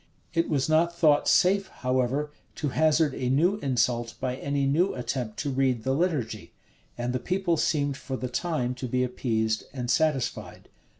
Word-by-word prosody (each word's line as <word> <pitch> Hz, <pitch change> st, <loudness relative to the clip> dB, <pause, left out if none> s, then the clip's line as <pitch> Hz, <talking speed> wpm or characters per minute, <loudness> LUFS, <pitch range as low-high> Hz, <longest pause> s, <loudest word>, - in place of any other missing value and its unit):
[] -, -, -38 dB
It 165 Hz, 0 st, +1 dB
was 140 Hz, -4 st, +1 dB
not 165 Hz, +2 st, +2 dB
thought 150 Hz, -3 st, +4 dB
safe, 195 Hz, +1 st, +4 dB
however, 130 Hz, +3 st, -1 dB, 0.2 s
to 150 Hz, -, -2 dB
hazard 155 Hz, 0 st, +2 dB
a 125 Hz, -1 st, -2 dB
new 170 Hz, +10 st, +3 dB
insult 120 Hz, -, 0 dB
by 130 Hz, -1 st, -2 dB
any 140 Hz, +1 st, -1 dB
new 165 Hz, +8 st, +2 dB
attempt 120 Hz, -3 st, -4 dB
to 145 Hz, -, -2 dB
read 130 Hz, -3 st, +1 dB
the 130 Hz, -, 0 dB
liturgy; 140 Hz, -, -2 dB, 0.4 s
and 120 Hz, +1 st, -2 dB
the 125 Hz, -, -1 dB
people 185 Hz, +1 st, 0 dB
seemed 145 Hz, -3 st, 0 dB
for 130 Hz, -1 st, -5 dB
the 125 Hz, -, -3 dB
time 125 Hz, -1 st, -1 dB
to 130 Hz, -, -2 dB
be 125 Hz, +1 st, 0 dB
appeased 110 Hz, -3 st, -1 dB
and 125 Hz, -2 st, -3 dB
satisfied. 150 Hz, -1 st, -1 dB
135 Hz, 175 wpm, -27 LUFS, 125-155 Hz, 0.4 s, thought